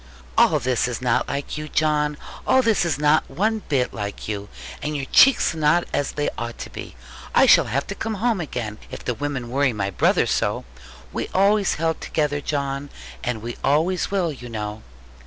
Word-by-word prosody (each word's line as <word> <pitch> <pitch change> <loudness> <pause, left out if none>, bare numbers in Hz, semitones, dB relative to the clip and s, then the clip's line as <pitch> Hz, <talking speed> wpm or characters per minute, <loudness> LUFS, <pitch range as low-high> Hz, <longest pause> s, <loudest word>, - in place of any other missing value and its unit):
'All - - +5
this 125 -1 0
is 125 - -3
not 125 -1 +1
like 140 +2 -3
you, 155 0 -6
John. 150 -1 +1 0.3
All 260 - +5
this 225 -6 +2
is 165 - 0
not 150 +1 +3
one 215 +3 0
bit 130 -4 +1
like 100 -1 -5
you: 105 -1 -4 0.3
and 150 +1 -3
your 140 -2 -2
cheeks 270 -9 +6
are 160 - -6
not 155 +3 +4
as 145 - 0
they 145 - -1
ought 120 0 -5
to - - -7
be. - - -8 0.4
I - - +7
shall - - +7
have 140 +3 -1
to - - -5
come 220 +2 -3
home 220 -1 0
again, 115 -8 -5
if - - -9
the 125 - 0
women 130 -2 -4
worry 135 -1 +2
my 100 -2 -2
brother 90 - +3
so. - - 0 0.5
We - - -2
always 200 +1 +3
held 160 0 -1
together, 145 -2 -1
John; 140 -1 -2 0.3
and 125 -4 -2
we 120 0 -5
always 160 +6 +2
will, 185 -5 0
you 125 -3 -10
know.' 105 -1 -5
145 Hz, 195 wpm, -23 LUFS, 125-165 Hz, 0.5 s, I